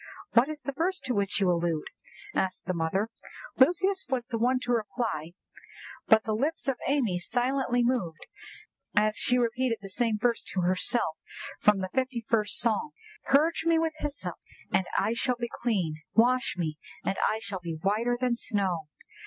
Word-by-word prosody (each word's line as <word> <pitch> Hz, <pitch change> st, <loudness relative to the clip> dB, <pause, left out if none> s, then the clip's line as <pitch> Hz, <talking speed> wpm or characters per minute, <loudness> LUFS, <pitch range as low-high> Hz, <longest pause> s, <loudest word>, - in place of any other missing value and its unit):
"What 240 Hz, +5 st, +5 dB
is 305 Hz, -1 st, -6 dB
the 275 Hz, -, -2 dB
verse 350 Hz, +7 st, -1 dB
to 250 Hz, -, -2 dB
which 200 Hz, -2 st, 0 dB
you 190 Hz, -3 st, +3 dB
allude?" 170 Hz, -2 st, 0 dB, 0.5 s
asked 190 Hz, -1 st, -1 dB
the 185 Hz, -, -1 dB
mother. 180 Hz, +6 st, 0 dB, 0.5 s
Lucius 365 Hz, +8 st, +3 dB
was 255 Hz, -3 st, -1 dB
the 235 Hz, -2 st, -3 dB
one 250 Hz, +2 st, +3 dB
to 245 Hz, -, -2 dB
reply, 210 Hz, -, -2 dB, 0.7 s
but 220 Hz, 0 st, +6 dB
the 220 Hz, -, -1 dB
lips 280 Hz, +7 st, -1 dB
of 270 Hz, -2 st, +1 dB
Amy 245 Hz, -11 st, +1 dB
silently 245 Hz, +4 st, +1 dB
moved, 215 Hz, -11 st, -1 dB, 0.7 s
as 215 Hz, 0 st, +4 dB
she 250 Hz, -, +2 dB
repeated 240 Hz, 0 st, +1 dB
the 195 Hz, -1 st, -10 dB
same 230 Hz, +1 st, +1 dB
verse 235 Hz, +2 st, +1 dB
to 185 Hz, -, +2 dB
herself 185 Hz, 0 st, +1 dB, 0.4 s
from 210 Hz, -2 st, +4 dB
the 185 Hz, -, -3 dB
fifty 260 Hz, -3 st, -1 dB
first 215 Hz, -3 st, +1 dB
Psalm—"'_Purge 310 Hz, -, 0 dB
me 335 Hz, 0 st, +4 dB
with 320 Hz, -1 st, +1 dB
hyssop, 295 Hz, -2 st, -4 dB, 0.4 s
and 190 Hz, -, +3 dB
I 210 Hz, +4 st, +2 dB
shall 250 Hz, +1 st, 0 dB
be 235 Hz, -1 st, -3 dB
clean; 185 Hz, -10 st, 0 dB, 0.2 s
wash 250 Hz, +2 st, +3 dB
me, 155 Hz, -3 st, -2 dB, 0.3 s
and 195 Hz, -, 0 dB
I 215 Hz, -, 0 dB
shall 200 Hz, -3 st, -5 dB
be 170 Hz, -2 st, -5 dB
whiter 220 Hz, +7 st, +1 dB
than 250 Hz, -1 st, +1 dB
snow! 190 Hz, -9 st, -1 dB
235 Hz, 170 wpm, -28 LUFS, 195-255 Hz, 0.7 s, but